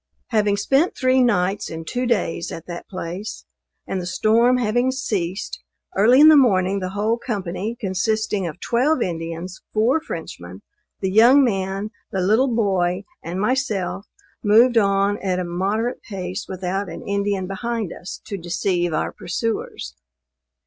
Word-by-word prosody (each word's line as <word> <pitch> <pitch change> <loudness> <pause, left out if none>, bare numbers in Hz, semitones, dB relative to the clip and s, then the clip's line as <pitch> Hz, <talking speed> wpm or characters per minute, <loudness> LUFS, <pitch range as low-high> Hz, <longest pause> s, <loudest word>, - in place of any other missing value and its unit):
Having 210 -2 +2
spent 270 - +2
three 255 0 +3
nights 200 -4 +1
and 160 0 -7
two 250 +7 -2
days 180 -7 -1
at 165 - -7
that 175 -1 -8
place, 185 +3 -6 0.4
and 190 - -3
the 175 - -5
storm 230 +6 +3
having 245 +2 +1
ceased, 195 -8 -3 0.3
early 230 +7 +5
in 305 - +9
the 315 - +9
morning 195 -8 +3
the 185 -1 -3
whole 220 +3 +1
company, 210 -1 -4
consisting 205 -1 -1
of 165 +2 -7
twelve 255 +6 +1
Indians, 165 +1 -5
four 240 +9 +3
Frenchmen, 95 - -8 0.4
the 190 -1 0
young 240 +7 +7
man, 195 -2 -1 0.2
the 190 - -1
little 220 +8 +3
boy 190 -4 +1 0.2
and 175 +3 -5
myself, 210 -4 -1 0.4
moved 230 +4 +5
on 200 0 +2
at 185 -2 -1
a 185 - -1
moderate 200 +8 -1
pace 185 -1 -5
without 190 +1 -3
an 165 - -8
Indian 200 -1 0
behind 210 +1 -3
us 180 - -8
to 200 - -5
deceive 175 0 -1
our - - -1
pursuers. 225 +6 -4
200 Hz, 150 wpm, -22 LUFS, 180-235 Hz, 0.4 s, in